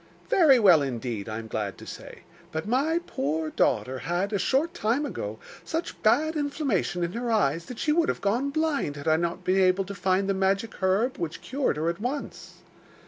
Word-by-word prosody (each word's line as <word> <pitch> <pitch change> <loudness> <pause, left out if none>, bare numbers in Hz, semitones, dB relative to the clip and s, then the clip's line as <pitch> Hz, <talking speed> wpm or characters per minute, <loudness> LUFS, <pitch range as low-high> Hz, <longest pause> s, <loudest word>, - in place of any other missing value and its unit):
'Very 305 -8 +6
well 185 -9 +6
indeed, 120 -5 -3
I 110 - -4
am 115 - -6
glad 105 -3 -3
to - - -11
say. - - -10 0.3
But 160 +3 -4
my 295 +8 +1
poor 155 +3 -2
daughter 130 0 +1
had, 175 +8 -2
a 200 - +1
short 280 - +1
time 260 -1 0
ago, 110 - -5 0.3
such 325 +2 -4
bad 310 +9 +3
inflammation 280 - -1
in 170 +1 -2
her 240 +1 -3
eyes 170 -7 +1
that 250 - -8
she 300 - 0
would 325 +1 +2
have - - -1
gone 235 +8 0
blind 290 - -1
had 145 +2 -7
I 155 0 +4
not 170 +1 -2
been 185 +1 +2
able 185 +1 +3
to 200 - -6
find 195 0 +1
the 195 - +2
magic 195 +3 0
herb, 200 +7 +1
which 165 -2 -4
cured 270 - -1
her 155 +2 -1
at 170 +4 -2
once. 270 +5 -5
195 Hz, 200 wpm, -26 LUFS, 160-270 Hz, 0.3 s, Very